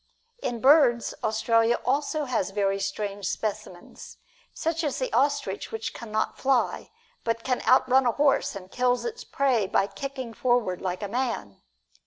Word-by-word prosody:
In 240 -2 -3
birds, 265 -4 +5
Australia 230 +1 +2
has - - -19
also 290 +4 0
very 200 -5 0
strange 200 0 -3
specimens, 210 -4 -5 0.3
such 330 +1 -2
as 290 -4 -1
the - - -3
ostrich 270 -8 0
which 225 0 -4
can 230 -2 -9
not 215 0 -1
fly, 265 -2 +1 0.3
but 230 0 -1
can 255 -1 0
outrun 260 0 +5
a - - +4
horse 280 -5 +2
and 190 -1 -9
kills 250 0 +1
its 465 -1 -5
prey 255 -8 +1
by 195 - +2
kicking 260 +1 -6
forward 240 -6 0
like 185 +2 -3
a - - -2
man. 230 - -3
235 Hz, 155 wpm, -26 LUFS, 205-265 Hz, 0.3 s, birds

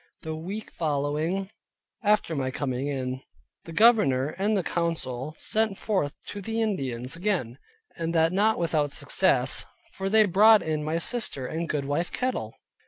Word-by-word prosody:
The 160 -1 -4
week 195 +7 -6
following, 155 +5 -1 0.5
after 210 -5 +2
my 130 -2 -1
coming 130 0 -2
in, 130 -2 -3 0.4
the 165 - -8
governor 165 - +4
and 200 -2 +1
council 155 -5 -2
sent 215 -2 0
forth 185 -10 -1
to 205 - -6
the 225 +3 -3
Indians 135 - -2
again; 170 - -2 0.4
and 165 -1 -2
that 165 +1 +3
not 215 +3 +3
without 150 -4 0
success; - - +2 0.3
for 195 0 -3
they 215 +1 +6
brought 210 +3 +6
in 155 -1 -2
my 155 +2 -1
sister, 170 - -1
and 165 +4 -3
goodwife 145 +3 -1
Kettle. 255 0 -2
165 Hz, 145 wpm, -26 LUFS, 145-205 Hz, 0.5 s, they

